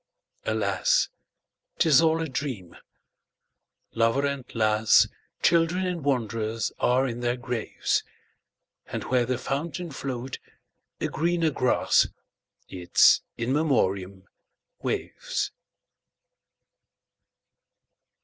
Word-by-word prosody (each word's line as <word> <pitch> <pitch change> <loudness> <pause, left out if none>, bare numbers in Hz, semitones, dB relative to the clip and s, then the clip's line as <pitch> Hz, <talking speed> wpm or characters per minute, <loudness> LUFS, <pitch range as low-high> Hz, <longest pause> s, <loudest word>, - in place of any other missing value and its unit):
Alas! - - +1 0.7
't - - +3
is 150 -3 +6
all 165 0 +2
a - - -3
dream. 125 - -5 1.2
Lover 115 +5 +2
and 140 -2 -2
lass, 110 -1 +4 0.4
Children 170 +2 +3
and 175 -4 -3
wanderers, 115 -5 -1
are 130 +2 +2
in 120 -1 -4
their 120 0 -1
graves; 120 -2 -1 0.8
And - - -4
where 125 -2 +1
the 130 -1 0
fountain 160 +6 -4
flow'd 130 -1 -5 0.6
a - - -1
greener 170 -1 0
grass—Its 95 -7 +1 0.2
In 120 +3 -1
Memoriam—waves. 100 -11 -2
130 Hz, 85 wpm, -26 LUFS, 115-160 Hz, 1.2 s, is